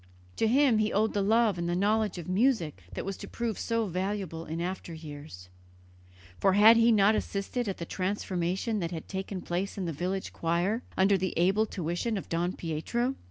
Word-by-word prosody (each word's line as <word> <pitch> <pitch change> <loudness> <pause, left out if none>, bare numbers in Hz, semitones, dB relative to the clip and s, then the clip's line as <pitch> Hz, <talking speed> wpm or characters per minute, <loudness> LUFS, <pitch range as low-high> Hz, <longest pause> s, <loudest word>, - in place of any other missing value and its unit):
To 225 - +2
him 255 -1 +4
he 215 0 +1
owed 215 +2 +1
the 205 - +1
love 215 -2 +3
and 170 0 -1
the 175 - 0
knowledge 210 +1 +1
of 170 - -7
music 185 - +1
that - - -4
was 195 0 -3
to - - -8
prove 235 -4 -3
so 230 -1 0
valuable 185 -3 -3
in 160 +2 -4
after 175 -1 -4
years, 145 - -10 0.9
for 195 - +4
had 215 +3 +8
he 230 +1 +5
not 210 -1 +5
assisted 215 +3 -2
at 195 - -3
the 170 - -5
transformation 185 +3 -2
that 170 -3 -2
had 165 -2 -6
taken 190 -1 -5
place 185 +4 -3
in 190 - -2
the 165 - -2
village 185 +6 -3
choir 175 +7 0 0.2
under 195 +1 +4
the 185 0 -2
able 195 +6 +3
tuition 180 +6 -2
of 195 - -7
Don 175 +2 0
Pietro? 205 - -2
195 Hz, 195 wpm, -29 LUFS, 175-215 Hz, 0.9 s, had